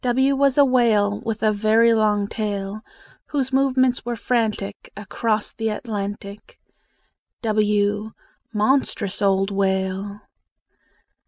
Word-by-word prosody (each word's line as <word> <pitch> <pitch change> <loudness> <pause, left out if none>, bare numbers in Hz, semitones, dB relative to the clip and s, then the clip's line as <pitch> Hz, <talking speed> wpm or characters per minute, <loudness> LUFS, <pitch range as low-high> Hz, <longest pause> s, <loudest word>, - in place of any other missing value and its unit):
W 265 +3 +2
was 275 -1 +2
a 285 - +7
whale 220 -5 +2
With 220 -1 -4
a 215 - +4
very 220 +2 +3
long 210 -2 +1
tail, 205 -1 -4 0.5
Whose 270 -3 -2
movements 260 -2 +2
were 240 0 -3
frantic 215 -4 -2
Across 215 +1 -2
the 225 -1 -3
Atlantic. 205 -2 -6 0.9
w 210 -1 +1 0.4
Monstrous 215 -3 0
old 195 0 +2
whale! 195 +1 -1
215 Hz, 105 wpm, -22 LUFS, 205-240 Hz, 0.9 s, a